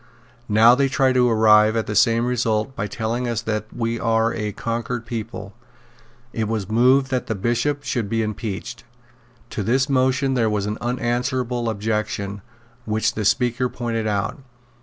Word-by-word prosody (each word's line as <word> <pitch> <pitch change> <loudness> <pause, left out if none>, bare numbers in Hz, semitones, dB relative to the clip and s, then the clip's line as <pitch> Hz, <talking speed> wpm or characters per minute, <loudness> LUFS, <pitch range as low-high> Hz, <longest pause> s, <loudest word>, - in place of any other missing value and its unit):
Now 110 +3 +6
they 135 +1 +2
try 130 -1 +2
to 125 -1 +3
arrive 110 -1 +5
at 115 - 0
the 105 - -4
same 115 +2 +3
result 120 0 0
by 100 - -3
telling 115 +4 -2
us 115 -1 -2
that 110 -1 -2
we 115 0 -2
are 115 0 +1
a 105 -1 -3
conquered 115 +2 -4
people." 105 -4 -6 0.8
It 110 -2 -1
was 110 -3 -2
moved 130 +4 +4
that 125 -1 -1
the 110 - -2
Bishop 120 +8 -1
should 120 -7 -2
be 115 +1 0
impeached. 105 -1 -5 0.7
To - - -3
this 130 +7 +1
motion 130 0 +2
there 115 -4 +2
was 105 -2 -1
an 105 +1 -3
unanswerable 120 0 -1
objection, 105 -2 -3 0.4
which 110 0 0
the 105 - -3
Speaker 125 +3 +1
pointed 115 -3 -3
out. 100 +7 -2
115 Hz, 160 wpm, -22 LUFS, 110-125 Hz, 0.8 s, Now